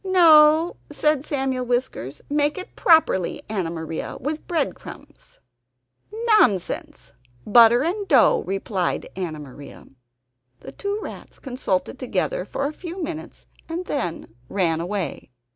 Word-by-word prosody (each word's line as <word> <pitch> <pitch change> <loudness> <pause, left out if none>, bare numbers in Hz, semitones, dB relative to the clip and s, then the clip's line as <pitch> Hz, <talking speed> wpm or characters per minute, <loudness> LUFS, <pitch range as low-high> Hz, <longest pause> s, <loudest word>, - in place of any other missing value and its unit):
"No," 325 -3 +5
said 300 -1 0
Samuel 265 -3 -1
Whiskers, 245 - -3
"make 295 +2 +1
it 370 - -8
properly, 320 - +3
Anna 195 -6 -2
Maria, 160 -1 -5
with 300 +4 -4
breadcrumbs." 340 -2 -5 1.0
"Nonsense! 195 -7 0 0.3
Butter 235 +3 +6
and 390 +5 -2
dough," 265 -8 +5
replied 195 -1 -2
Anna 175 -5 -4
Maria. 145 -1 -11 0.8
The - - -9
two 405 0 -3
rats - - -10
consulted 250 -3 -3
together 195 -7 -2
for 275 +7 -3
a 290 - -2
few 350 +2 -7
minutes 320 0 -7 0.2
and 340 +3 -4
then 175 - -4 0.2
went 170 -5 0
away. 180 -3 -4
255 Hz, 120 wpm, -23 LUFS, -, 1.0 s, Butter